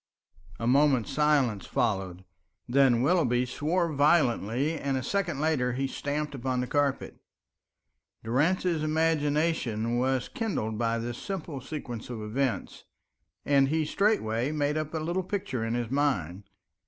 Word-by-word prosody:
A 115 - -3
moment's 130 -3 +3
silence 140 - +2
followed, 95 -5 -1 0.4
then 125 -2 +4
Willoughby 130 -7 +2
swore 165 +6 -1
violently, 140 - +2
and 140 -3 -1
a 130 - -3
second 180 -1 -1
later 145 -5 +1
he 135 +2 -1
stamped 145 +2 -3
upon 130 -1 -2
the 125 - 0
carpet. 140 +1 -1 1.0
Durrance's 160 +7 +1
imagination 150 -7 0
was 130 0 0
kindled 145 - -3
by 115 -1 +1
this 120 +1 -4
simple 165 -8 -5
sequence 125 -5 -6
of 120 -3 -5
events, 125 +4 -2 0.6
and 140 -1 +4
he 155 +2 0
straightway 145 - +1
made 150 -1 0
up 155 -1 -2
a - - +1
little 170 +4 -1
picture 180 - -3
in 115 +1 -1
his 120 -1 -3
mind. 100 - 0
135 Hz, 135 wpm, -28 LUFS, 120-155 Hz, 1.0 s, then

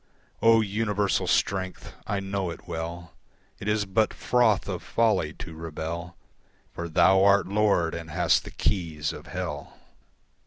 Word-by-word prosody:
O 115 0 +6
universal 105 -1 0
strength, 95 -2 -1
I 100 -1 -1
know 95 -1 -2
it 85 - -9
well, 85 0 -5 0.5
It 100 - -7
is 105 -1 +1
but 105 +3 +1
froth 120 -5 +2
of - - -3
folly 105 -9 +1
to 80 - -8
rebel; 80 +2 -6 0.6
For 85 0 -5
thou 95 +4 +5
art 100 0 +5
Lord 100 -5 +2
and 85 -1 -6
hast - - +2
the - - -8
keys 80 -6 -1
of - - -10
Hell. - - -5
95 Hz, 145 wpm, -26 LUFS, 85-105 Hz, 0.6 s, O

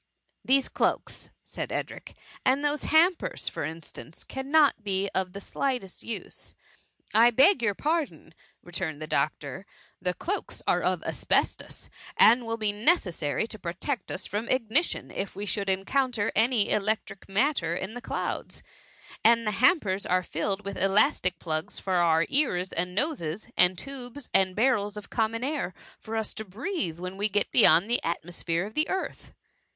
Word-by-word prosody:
" - - -49
These 275 0 +5
cloaks," - - -1
said - - -5
Edric, - - -5
" - - -21
and 270 +3 +2
those 295 +1 0
hampers, 335 +3 +2
for - - -3
instance, 160 0 -8
cannot 275 -2 +2
be 195 -1 0
of 185 -1 -1
the 200 - -6
slightest 245 -3 -3
use." 230 - -7 0.6
a - - +3
I 235 +1 +8
beg 270 - +5
your 205 -4 +1
pardon," 310 - -2 0.3
returned 175 -4 -4
the 155 - -5
doctor: 150 +4 -2
^^ - - -28 0.3
The 180 0 -1
cloaks 400 +4 -4
dre - - +3
of - - 0
asbestos, - - -1 0.3
and 235 +1 +6
will 230 0 -2
be 215 -2 0
neces 215 - +2
sary 150 +6 -1
to 220 -1 -7
protect 190 - -3
us 190 - -3
from 215 +3 -3
ignition, 255 +6 +1
if 195 -1 -4
we 200 +2 -4
should' 200 0 -1
encounter 220 +4 0
any 225 -1 +3
electric 210 -1 -1
matter 195 - +1
in 190 +4 -4
the 245 - -7
clouds; - - -4 0.6
and 230 0 +5
the 210 - +1
hampers 210 - +2
are 185 0 +2
filled 195 +5 -2
with 200 0 -4
elastic 195 - +2
plugs 155 -2 -3
for 190 - -3
our 165 -1 +4
ears 190 -11 +1
and 180 +2 -2
noses, 215 - -2
and 180 0 +4
tubes 265 +2 -8
and 185 -1 +3
barrels 210 -3 +1
of 210 - -9
common 230 +1 0
air, 280 - -2 0.2
for 225 +1 -5
us 220 -1 -2
to 220 - -5
breathe 210 - -4
when 185 +2 -6
we 205 +2 +1
get 205 0 0
beyond 180 -5 +6
the 240 - +1
atmosphere 170 +1 -2
of 215 - -9
the 305 +4 +1
earth." 380 0 -4
210 Hz, 170 wpm, -27 LUFS, 185-255 Hz, 0.6 s, I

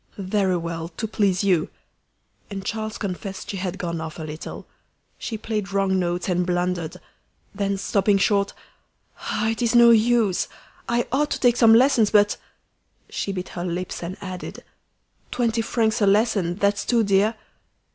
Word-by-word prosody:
"Very 190 -1 0
well; 165 -1 -4
to 200 +6 -5
please 200 -3 +1
you!" 180 -5 +2 0.8
And 195 -2 -6
Charles 215 +1 -3
confessed 195 -1 -5
she 200 - -5
had 185 0 -3
gone 170 -3 -3
off 160 -1 -6
a 160 - -6
little. 155 +1 -7 0.5
She 225 - -4
played 210 -2 -3
wrong 195 -1 +1
notes 175 0 -1
and 180 -1 +1
blundered; 175 -2 -1 0.6
then, 200 -1 -1
stopping 200 +1 +2
short 200 0 +2 0.7
"Ah! 215 +1 -1
it 225 0 -2
is 235 0 +1
no 235 0 +8
use. 225 -4 +3 0.4
I 235 0 +1
ought 295 +3 +1
to - - -2
take 245 -2 +4
some 225 -2 +7
lessons; 240 -3 +4
but 205 -1 +4 0.4
" - - -48 0.3
She 200 - -2
bit 185 -1 -5
her 175 - -5
lips 180 +1 -4
and 175 +2 -5
added, 185 -2 -7 0.7
"Twenty 230 -2 0
francs 225 0 0
a 205 - +4
lesson, 200 -4 +2
that's 200 +1 +1
too 235 -2 +2
dear!" 200 +2 +2
200 Hz, 165 wpm, -23 LUFS, 180-220 Hz, 0.8 s, no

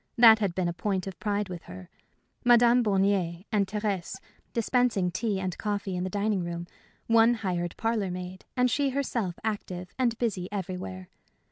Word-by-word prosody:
That 225 -2 +9
had 195 -5 -1
been 185 -2 0
a 170 - -1
point 190 0 -2
of 195 -2 -7
pride 205 -1 -1
with 175 -3 -7
her. 90 0 -10 0.6
Madame 240 0 +6
Bornier 195 -3 +1
and 200 -2 +2
Thérèse 200 -3 -2 0.4
dispensing 230 -5 +1
tea 205 +1 -1
and 185 -2 -3
coffee 205 -2 -2
in 180 - -2
the 185 - -2
dining 205 -1 0
room, 170 0 -4 0.4
one 230 +1 +5
hired 180 -5 -3
parlor 225 -4 0
maid, 180 +1 -6
and 250 -1 +3
she 280 +2 +2
herself 240 -9 -2
active 185 -4 -4
and 235 -3 +2
busy 200 -7 -2
everywhere. 180 - -5
200 Hz, 165 wpm, -28 LUFS, 180-225 Hz, 0.6 s, That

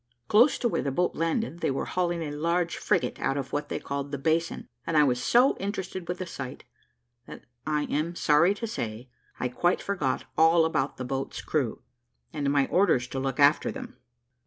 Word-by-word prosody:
Close 240 +7 +5
to 240 - 0
where - - 0
the 140 - -2
boat 175 +6 +1
landed, 165 +3 -1
they - - 0
were 135 - -1
hauling 175 -2 -1
a 150 - -4
large 170 +3 0
frigate - - 0
out 135 - 0
of 135 -1 -5
what 145 0 -2
they - - -2
called 140 0 -4
the 140 - -2
basin; 160 +4 -1 0.2
and 165 - +1
I 150 - +7
was 125 -3 +1
so 245 - +4
interested 190 -3 -4
with 180 +1 -3
the 185 - -4
sight, 140 -6 -7 0.6
that - - -10 0.2
I 150 -1 +1
am 155 +4 -2
sorry 170 +5 +4
to 230 - -4
say, 120 - -5 0.3
I 125 - 0
quite 175 +8 +1
forgot 165 -10 -2
all 160 +1 +5
about 145 -4 -1
the 130 - -4
boat's 135 +1 -3
crew, 135 -8 -1 0.5
and 145 -3 -1
my 140 -1 +3
orders 170 -10 +3
to 135 - -3
look 135 0 -2
after 145 +2 +4
them. 255 -1 -8
155 Hz, 200 wpm, -27 LUFS, 140-180 Hz, 0.6 s, I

